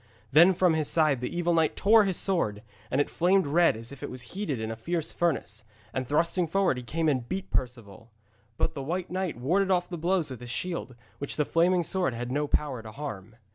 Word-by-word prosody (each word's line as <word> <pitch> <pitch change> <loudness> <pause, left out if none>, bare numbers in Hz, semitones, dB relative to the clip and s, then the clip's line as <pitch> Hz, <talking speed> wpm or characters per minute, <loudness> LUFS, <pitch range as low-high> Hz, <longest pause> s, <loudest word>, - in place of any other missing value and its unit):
Then 170 +6 +7
from 180 -1 +3
his 155 -2 0
side 155 -6 +2
the 125 - -2
evil 175 0 +1
knight 160 -2 +2
tore 215 +1 +5
his 190 -3 0
sword, 110 - 0 0.3
and 130 - 0
it 145 - +2
flamed 185 +2 +2
red 165 -3 +3
as 115 +2 -8
if 140 - -11
it - - -5
was 125 -1 -7
heated 180 - -2
in 110 0 -3
a - - -4
fierce 165 +7 -2
furnace, 135 -10 -1 0.3
and 130 -1 -2
thrusting 170 +4 +1
forward 185 -4 +1
he - - -4
came 160 +7 -2
and 130 -5 0
beat 190 0 -3
at - - -34
Perceval. 115 -3 -4 0.5
But 160 - 0
the 140 - -5
White 175 +6 -3
Knight 185 -6 -2
warded 180 +11 +1
off 180 -1 +2
the 175 -2 -5
blows 175 -3 0
with 130 - -7
his 120 - -8
shield, 170 -2 -4 0.2
which 140 - -3
the 150 - +1
flaming 175 +3 +2
sword 180 -7 -1
had 120 +1 -4
no 145 +2 0
power 140 -5 -1
to 110 -1 -10
harm. 110 -6 -7
155 Hz, 230 wpm, -28 LUFS, 125-175 Hz, 0.5 s, Then